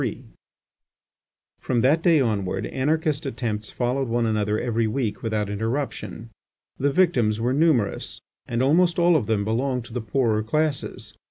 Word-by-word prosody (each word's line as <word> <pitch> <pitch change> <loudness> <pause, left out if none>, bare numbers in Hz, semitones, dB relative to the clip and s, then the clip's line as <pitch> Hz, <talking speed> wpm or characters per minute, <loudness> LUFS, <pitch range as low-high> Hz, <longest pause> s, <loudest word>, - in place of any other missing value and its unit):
3 - - -3 1.4
From 120 -2 0
that 145 +7 +3
day 165 -2 +4
onward, 105 -7 -1
anarchist 150 +1 -1
attempts 115 -4 -3
followed 125 +2 -1
one 115 0 0
another 105 -1 0
every 115 -1 0
week 110 -1 -2
without 110 -2 -1
interruption. 115 +1 -4 0.5
The 140 - +2
victims 125 -11 +2
were 120 +3 0
numerous, 145 -8 +1 0.3
and 120 +1 0
almost 170 +5 +3
all 175 0 +4
of 125 -10 +1
them 105 -2 +1
belonged 125 +2 -1
to 115 - -12
the 125 - -2
poorer 110 -1 +1
classes. 150 +6 -2
120 Hz, 150 wpm, -24 LUFS, 110-140 Hz, 1.4 s, day